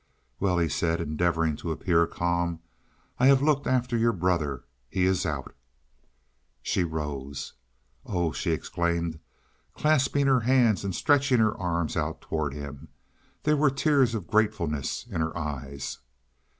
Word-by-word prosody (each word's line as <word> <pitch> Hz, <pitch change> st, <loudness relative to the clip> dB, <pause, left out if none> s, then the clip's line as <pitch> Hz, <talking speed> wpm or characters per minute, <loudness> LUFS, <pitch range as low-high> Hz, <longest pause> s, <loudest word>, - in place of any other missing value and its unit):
"Well," 95 Hz, -3 st, +1 dB
he 85 Hz, -1 st, +2 dB
said, 80 Hz, +2 st, 0 dB
endeavoring 80 Hz, 0 st, 0 dB
to 85 Hz, -, -4 dB
appear 85 Hz, +1 st, +2 dB
calm, 85 Hz, -1 st, -1 dB, 0.6 s
"I 130 Hz, -, +5 dB
have 135 Hz, 0 st, +5 dB
looked 145 Hz, -2 st, +2 dB
after 125 Hz, -1 st, +1 dB
your 115 Hz, 0 st, +3 dB
brother. 85 Hz, -, 0 dB, 0.3 s
He 95 Hz, -, 0 dB
is 95 Hz, -2 st, +1 dB
out." 75 Hz, -3 st, -4 dB, 1.1 s
She 90 Hz, -, +1 dB
rose. 70 Hz, -4 st, -5 dB, 0.5 s
"Oh," 85 Hz, -4 st, -1 dB
she 85 Hz, -, -3 dB
exclaimed, 85 Hz, 0 st, -1 dB, 0.6 s
clasping 145 Hz, -2 st, +2 dB
her 135 Hz, -2 st, +4 dB
hands 120 Hz, -4 st, +3 dB
and 95 Hz, -3 st, -2 dB
stretching 140 Hz, -3 st, +3 dB
her 110 Hz, -1 st, +3 dB
arms 85 Hz, -3 st, -2 dB
out -, -, -2 dB
toward 75 Hz, -3 st, -3 dB
him. 70 Hz, +1 st, -8 dB, 0.6 s
There 150 Hz, 0 st, +3 dB
were 150 Hz, -1 st, +4 dB
tears 135 Hz, -3 st, +2 dB
of 105 Hz, -6 st, -4 dB
gratefulness 85 Hz, -, 0 dB
in 95 Hz, -9 st, -3 dB
her 80 Hz, +1 st, -2 dB
eyes. 70 Hz, -3 st, -5 dB
85 Hz, 140 wpm, -27 LUFS, 80-120 Hz, 1.1 s, I